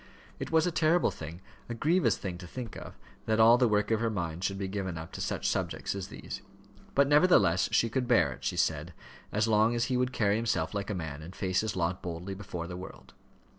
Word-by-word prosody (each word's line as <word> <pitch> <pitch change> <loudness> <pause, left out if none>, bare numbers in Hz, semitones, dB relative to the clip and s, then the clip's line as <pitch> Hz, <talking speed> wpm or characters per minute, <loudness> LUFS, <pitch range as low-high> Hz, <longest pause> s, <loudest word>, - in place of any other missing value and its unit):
It - - -4
was 160 -1 +3
a 180 - +1
terrible 165 +2 +3
thing 80 +3 -8 0.3
a 120 - -3
grievous 165 +9 +2
thing 90 -2 -5
to 90 - -9
think 120 +3 -7
of, - - -9 0.3
that 110 0 +2
all 115 +2 +7
the 125 - +4
work 105 0 +1
of 110 - +3
her 115 0 +1
mind 85 -4 -3
should 95 0 -1
be 95 -1 -3
given 95 -3 -3
up 80 0 -7
to - - -6
such - - -2
subjects - - -1
as 95 -2 -5
these. - - -8 0.5
But, 140 0 +5
nevertheless, 145 - +4
she 115 - +3
could 125 +2 -1
bear 120 -2 +4
it," - - -15
she - - -2
said, - - 0 0.4
"as 105 +2 +1
long 110 +2 +3
as 120 - +1
he - - +2
would 125 0 +1
carry 105 -4 +2
himself 105 -8 -1
like 100 0 -3
a 105 - -1
man, 80 -4 -5
and 85 +5 -10
face 95 -2 0
his 110 -2 -3
lot 90 +1 -1
boldly 90 +2 -5
before 95 -4 -6
the 90 +1 -6
world." 90 - -11
105 Hz, 235 wpm, -30 LUFS, 90-120 Hz, 0.5 s, all